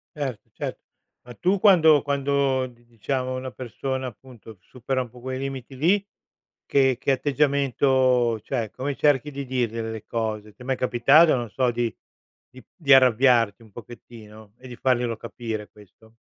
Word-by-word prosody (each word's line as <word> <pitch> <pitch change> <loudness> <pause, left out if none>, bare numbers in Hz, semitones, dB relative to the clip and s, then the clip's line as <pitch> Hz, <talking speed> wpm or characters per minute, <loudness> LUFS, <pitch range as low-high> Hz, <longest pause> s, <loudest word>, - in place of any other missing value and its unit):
Cert 135 -7 -4
cert - - -5 0.5
Ma 120 - -10
tu 185 - +1
quando 160 -8 +6
quando 140 -2 0
di 120 -1 -20
diciamo 130 +2 -3
una 130 0 -5
persona 130 +2 -5
appunto, 115 -3 -13
supera 130 +1 -3
un 125 - -7
po' 125 - -15
quei 130 +1 -5
limiti 135 -1 -6
lì, 190 +7 +2 0.6
che 135 -3 +3
che - - 0
atteggiamento 130 -3 +2
cioè 115 -2 -3
come 140 +2 -4
cerchi 145 0 +2
di 140 0 -5
dirgliele 115 -3 -2
le 110 -2 -7
cose? 110 -2 -4
Ti 125 - -15
è - - -11
mai 130 0 -1
capitato 135 +7 +4
non 120 -3 -3
so, 125 +5 +1
di 120 -1 -2 0.6
di 130 -1 -15
di 145 -5 +2
arrabbiarti 120 -4 +4
un 110 - -19
pochettino 110 -2 -13
e 130 - -13
di 120 - -9
farglielo 125 -3 0
capire, 110 -2 -6
questo? 110 +2 -20
130 Hz, 160 wpm, -24 LUFS, 115-135 Hz, 0.6 s, quando